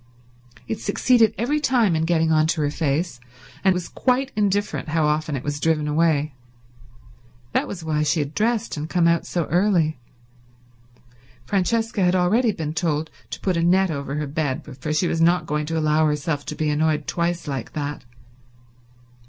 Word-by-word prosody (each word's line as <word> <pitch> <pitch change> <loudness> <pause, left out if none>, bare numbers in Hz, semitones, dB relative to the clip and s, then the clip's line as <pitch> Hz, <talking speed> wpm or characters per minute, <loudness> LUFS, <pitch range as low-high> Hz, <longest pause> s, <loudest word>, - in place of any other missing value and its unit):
It 220 - -3
succeeded 225 +2 +3
every 285 +7 0
time 240 - +2
in 160 0 0
getting 165 -1 +2
on 155 0 +3
to 160 -1 0
her 145 -1 0
face, 150 -1 -1 0.4
and 190 - +5
was 180 -1 -2
quite 265 +1 0
indifferent 205 -4 0
how 155 0 +1
often 150 0 0
it 130 - -4
was 145 0 -3
driven 155 -1 +1
away. 155 -1 +1 1.2
That - - 0
was 180 -4 -7
why 155 -1 0
she 150 +2 +1
had 145 0 -3
dressed 225 +2 0
and 155 +1 -5
come 175 -2 +2
out 170 0 +1
so 170 -3 -1
early. 175 -5 +2 1.5
Francesca 220 - 0
had 180 +1 +3
already 215 +7 +3
been 155 -5 -4
told 160 -2 -1 0.2
to - - -6
put 185 -2 0
a - - +1
net 185 +2 +3
over 140 -1 -4
her 150 0 -2
bed, 145 -2 -2
for 150 +4 -3
she 155 +4 +1
was 165 - -1
not 175 +2 +3
going 150 0 -2
to 165 0 -2
allow 155 0 +2
herself 150 0 -2
to 150 - -4
be 155 -1 0
annoyed 155 0 +1
twice 170 -1 -2
like 135 -5 -4
that. 145 -2 -4
160 Hz, 175 wpm, -23 LUFS, 150-185 Hz, 1.5 s, and